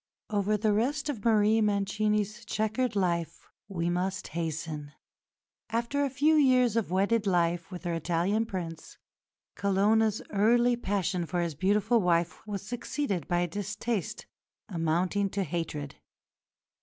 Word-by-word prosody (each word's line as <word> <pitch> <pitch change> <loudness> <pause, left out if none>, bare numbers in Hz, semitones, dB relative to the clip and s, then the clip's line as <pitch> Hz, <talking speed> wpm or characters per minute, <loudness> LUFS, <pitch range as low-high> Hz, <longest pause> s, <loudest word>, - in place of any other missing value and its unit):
Over 210 0 +1
the 215 0 +2
rest 280 +8 0
of 230 -9 -4
Marie 220 -1 +4
Mancini's 210 +1 0
chequered 220 +3 -1
life 170 -4 -1 0.2
we 170 -4 -2
must 185 +2 -2
hasten. 155 -2 -4 0.8
After 235 +5 0
a 280 - +1
few 290 +4 +3
years 255 -6 +4
of 230 -6 0
wedded 200 +4 +1
life 175 -2 +1
with 180 -2 -8
her 175 -1 -2
Italian 175 +7 0
Prince, 170 -6 -6 0.6
"Colonna's 205 +2 +2
early 235 +4 +4
passion 190 -5 -1
for 175 - -1
his 170 -2 -1
beautiful 205 - +2
wife 175 +2 0
was 205 -2 -4
succeeded 245 - -3
by 175 0 +1
a 175 - +1
distaste 205 +3 -3 0.4
amounting 180 +3 0
to 195 +1 -1
hatred. 155 -4 -4
200 Hz, 130 wpm, -29 LUFS, 175-225 Hz, 0.8 s, Marie